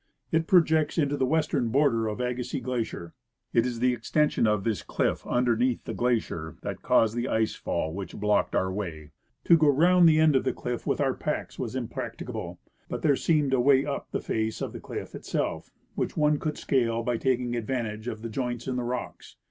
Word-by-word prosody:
It 160 0 +1
projects 160 -4 +3
into 145 -3 +2
the 130 -2 0
western 150 -5 +1
border 115 -4 +2
of 105 +2 -4
Agassiz 125 +1 -2
glacier. 115 -9 -3 0.4
It 115 +1 +3
is 120 -2 -4
the 125 0 +3
extension 120 +2 +1
of 105 -2 +1
this 110 -2 -1
cliff - - -1
underneath 120 0 +1
the - - -5
glacier 110 -10 -1
that - - -5
caused 110 0 +3
the 120 +1 -1
ice 110 -3 +1
fall 80 - -3
which 95 -1 -6
blocked 105 0 +1
our 95 0 +1
way. 80 -7 -5 0.3
To 170 - +6
go 155 - +4
round 170 +4 +6
the 155 0 +4
end 155 -2 +5
of 130 - +3
the - - 0
cliff 125 -1 -5
with - - 0
our - - +2
packs - - -4
was - - -4
impracticable, - - -5 0.3
but - - -4
there 145 -3 +4
seemed 150 -2 +1
a 130 - +3
way 135 +1 +4
up 140 -1 -4
the - - -2
face 110 0 -2
of - - -4
the - - -6
cliff - - -7
itself, - - -3 0.2
which - - -3
one 150 -1 +3
could 155 -2 -3
scale 115 -4 0
by 120 0 0
taking 125 -1 0
advantage 115 -2 -3
of 110 -2 -5
the 115 - -4
joints 120 0 -3
in 130 -1 -1
the 125 - -1
rocks. 125 +1 -5
125 Hz, 205 wpm, -27 LUFS, 110-145 Hz, 0.4 s, To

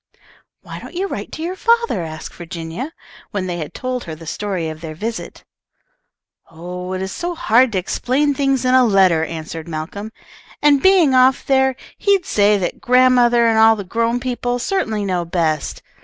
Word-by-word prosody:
"Why - - -8
don't - - -11
you 375 +3 -1
write - - -6
to 315 - -5
your 360 +3 -3
father?" 465 - +1
asked 155 -1 -8
Virginia, 170 - -6 0.4
when 200 -4 -3
they 175 -1 -3
had 155 - -5
told 255 -1 -4
her 160 -3 -6
the 165 +1 -12
story 185 0 -3
of 155 0 -7
their 160 -2 -7
visit. 225 +7 -6 1.1
"Oh, 180 +3 -7
it 185 0 -3
is 190 - -4
so 345 - -4
hard 250 -5 +3
to - - 0
explain 265 +10 0
things 270 -2 0
in 255 - +3
a 260 0 +6
letter," 190 -7 +4
answered 160 0 -6
Malcolm, 170 +7 -6 0.5
"and 290 -2 +4
being 370 -8 +5
off 255 +1 +4
there, 265 -1 +2 0.2
he'd 395 -3 +2
say 205 0 +3
that 185 -3 -3
grandmother 250 -2 +4
and 225 -1 +3
all 225 0 +6
the 205 - -6
grown 230 +5 -1
people 245 -1 -2
certainly 230 - -1
know 180 -3 -1
best. 165 -3 -2
225 Hz, 180 wpm, -19 LUFS, 175-260 Hz, 1.1 s, a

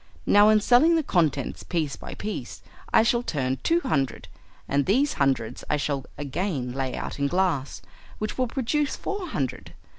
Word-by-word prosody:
Now 205 +1 +6
in 215 0 +6
selling 250 +10 +5
the 320 - +2
contents 155 - 0
piece 160 -5 -2
by - - -9
piece 215 +1 -6 0.3
I 220 - +6
shall 235 +1 +2
turn 135 - -2
two 335 +1 +2
hundred, 140 - -1 0.4
and 140 0 +1
these 270 +8 +3
hundreds 130 -5 0
I 150 - +2
shall 140 -2 -2
again 145 -2 -2
lay 130 0 -3
out - - -5
in 140 - +2
glass, 170 -5 -1 0.3
which 215 - -3
will 255 -1 0
produce 270 +4 -1
four 395 -2 -4
hundred. 135 - -4
175 Hz, 170 wpm, -25 LUFS, -, 0.4 s, Now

